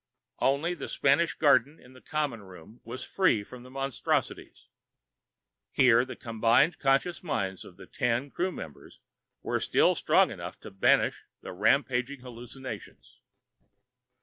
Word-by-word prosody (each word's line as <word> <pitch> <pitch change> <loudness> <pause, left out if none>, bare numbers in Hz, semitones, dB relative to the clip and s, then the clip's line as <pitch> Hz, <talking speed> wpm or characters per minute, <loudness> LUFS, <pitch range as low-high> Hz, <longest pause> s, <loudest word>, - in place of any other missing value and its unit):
Only 140 +6 +1
the 155 -6 -7
Spanish 155 +5 +2
garden 145 0 +3
in 125 - -17
the 130 - -16
common 145 -7 -2
room 95 +3 -14
was 120 +3 -7
free 175 - +2
of 125 +4 -12
the 125 - -13
monstrosities. 135 -1 -3 1.1
Here, 125 -2 +5
the 130 - -8
combined 115 +7 +2
conscious 135 +5 +1
minds 95 - -3
of 90 - -14
the - - -12
ten 125 +2 -1
crew 185 +2 -1
members 80 - -10 0.4
were - - -1
still - - +3
strong - - +3
enough - - -8
to - - -10
banish 95 - +2 0.2
the - - -8
rampaging 125 +5 +1
hallucinations. 125 -2 -10
130 Hz, 135 wpm, -28 LUFS, 115-140 Hz, 1.1 s, Here